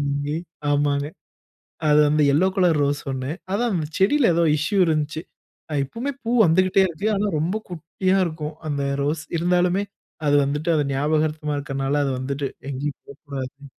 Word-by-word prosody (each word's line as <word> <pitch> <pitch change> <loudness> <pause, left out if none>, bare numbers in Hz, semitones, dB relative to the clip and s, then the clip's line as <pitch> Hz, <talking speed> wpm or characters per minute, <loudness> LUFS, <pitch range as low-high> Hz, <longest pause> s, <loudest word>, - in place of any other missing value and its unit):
வாங்கி, 145 +1 -1 0.3
ஆமாங்க. 145 0 +1 0.8
அது 150 0 +6
வந்து 150 0 +3
எல்லோ 180 +6 +4
கலர் 175 -5 +3
ரோஸ் 145 0 0
1. 130 +2 -3 0.2
அதான் 220 -4 +1 0.2
செடியில 230 +2 +4
ஏதோ 170 - +3
இஷ்யூ 175 +7 -1
இருந்தச்சு. 155 0 -1 0.5
அ - - -2
இப்பமே 235 - -4
பூ 230 - -2
வந்துக்கிட்டே 185 +3 +4
இருக்கு. 175 +5 -3
ஆனா 205 +1 0
ரொம்ப 170 +7 -1
குட்டியா 185 +3 -1
இருக்கும். 155 -2 -5
அந்த 140 -1 -1 0.2
ரோஸ், 155 +2 -1
இருந்தாலுமே 180 +3 +2 0.4
அது 145 - +4
வந்துட்டு 150 +4 -2
அது 150 - +2
ஞாபகார்த்தமா 150 +1 0
இருக்கனால, 135 0 -2
அது 135 - 0
வந்துட்டு 140 +2 -2 0.2
எங்கேயும் 140 +1 -4
போ - - -9
கூடாது 140 0 -6
155 Hz, 150 wpm, -23 LUFS, 145-180 Hz, 0.8 s, அது